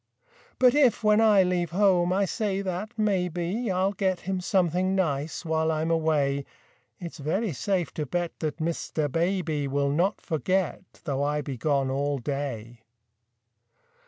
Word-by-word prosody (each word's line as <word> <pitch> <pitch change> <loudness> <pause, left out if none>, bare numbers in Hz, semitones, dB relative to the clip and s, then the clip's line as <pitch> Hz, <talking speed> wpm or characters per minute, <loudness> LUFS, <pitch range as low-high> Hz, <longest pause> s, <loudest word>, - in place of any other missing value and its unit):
But 250 -1 +5
if, 270 -6 +3
when 210 +1 +4
I 210 -3 +6
leave 180 -2 0
home, 180 -1 +3
I 195 +2 +2
say 200 0 -2
that 190 +3 -3
maybe 190 +1 -1
I'll 190 +1 +1
get 190 -2 -1
him 190 -1 -3
something 185 0 +1
nice 155 -4 -1
while 160 0 +1
I'm 160 +1 -1
away, 150 -4 +1 0.6
It's 170 -3 -8
very 185 +7 -1
safe 180 +4 -1
to 150 -2 -3
bet 175 +4 -3
that 155 -1 -3
Mr. 155 -2 -2
Baby 165 -3 0
Will 140 0 0
not 180 +8 +1
forget, 185 +4 -1 0.2
though 140 -4 -2
I 150 +1 0
be 140 -2 -5
gone 135 0 0
all 140 +1 0
day. 120 -4 -4
170 Hz, 150 wpm, -26 LUFS, 145-190 Hz, 0.6 s, I